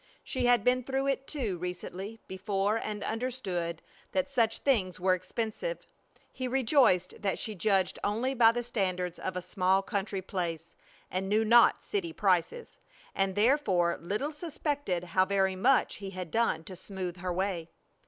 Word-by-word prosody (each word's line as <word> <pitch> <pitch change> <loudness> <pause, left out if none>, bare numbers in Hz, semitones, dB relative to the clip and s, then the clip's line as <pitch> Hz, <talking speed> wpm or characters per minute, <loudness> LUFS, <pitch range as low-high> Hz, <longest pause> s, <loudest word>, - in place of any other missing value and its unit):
She 255 -2 -1
had 245 -4 +4
been 250 +1 +3
through 270 +2 -1
it 270 0 -1
too 225 - -3
recently 180 +4 -5
before 195 +2 0
and 210 -2 -4
understood 200 -9 -3 0.3
that 280 0 0
such 230 -4 +2
things 195 -11 +1
were 185 0 +3
expensive. 220 - -3 0.5
He 255 - -3
rejoiced 250 - +3
that 195 -2 0
she 220 - -3
judged 190 -1 +1
only 230 +6 0
by 230 -3 +6
the 240 0 -2
standards 185 -6 -2
of 185 -1 -3
a 180 - -4
small 185 +1 +2
country 195 -2 -2
place, 170 -3 -4 0.4
and 190 +1 -2
knew 215 +2 +3
not 235 +2 +6
city 360 -5 -3
prices, 195 - 0 0.3
and 195 -1 0
therefore 205 -7 +2
little 210 - -2
suspected 290 - -2
how 185 +1 +2
very 190 -1 +1
much 250 +8 +3
he 195 -1 -6
had 185 -3 -6
done 225 -8 +1
to 185 - -9
smooth 185 -1 -6
her 180 0 -3
way. 180 -2 -2
200 Hz, 160 wpm, -30 LUFS, 185-245 Hz, 0.5 s, by